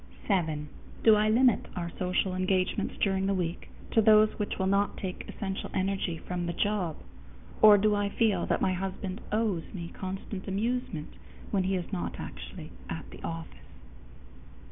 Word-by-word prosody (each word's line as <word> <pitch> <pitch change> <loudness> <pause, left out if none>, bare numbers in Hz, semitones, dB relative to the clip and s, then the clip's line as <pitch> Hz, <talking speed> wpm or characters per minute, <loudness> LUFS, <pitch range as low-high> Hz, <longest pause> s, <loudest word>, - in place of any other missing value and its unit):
_7. 160 -7 +1 0.4
Do 220 -1 +8
I 210 +1 +3
limit 240 +1 +4
our 170 -1 -3
social 185 +1 +1
engagements 185 0 0
during 195 -1 +1
the 195 - +2
week 175 -2 -3 0.2
to 225 - +5
those 215 0 +7
which 210 - -2
will 190 - 0
not 200 +1 +2
take 185 -2 -5
essential 195 -2 -4
energy 190 -3 0
from 175 +1 -4
the 170 - -1
job, 185 -4 0 0.7
or 210 -1 +10
do 210 +1 +3
I 205 0 +1
feel 220 0 +1
that - - +1
my 185 - +2
husband 190 +2 -4
"owes" 210 -6 0
me 170 -2 -5
constant 190 +1 -6
amusement 200 -5 -2 0.4
when 195 -3 +1
he 190 +1 +1
is 180 -2 -4
not 85 -1 -2
actually - - -8 0.2
at - - -6
the - - -11
office? 165 0 -6
190 Hz, 165 wpm, -29 LUFS, 180-210 Hz, 0.7 s, or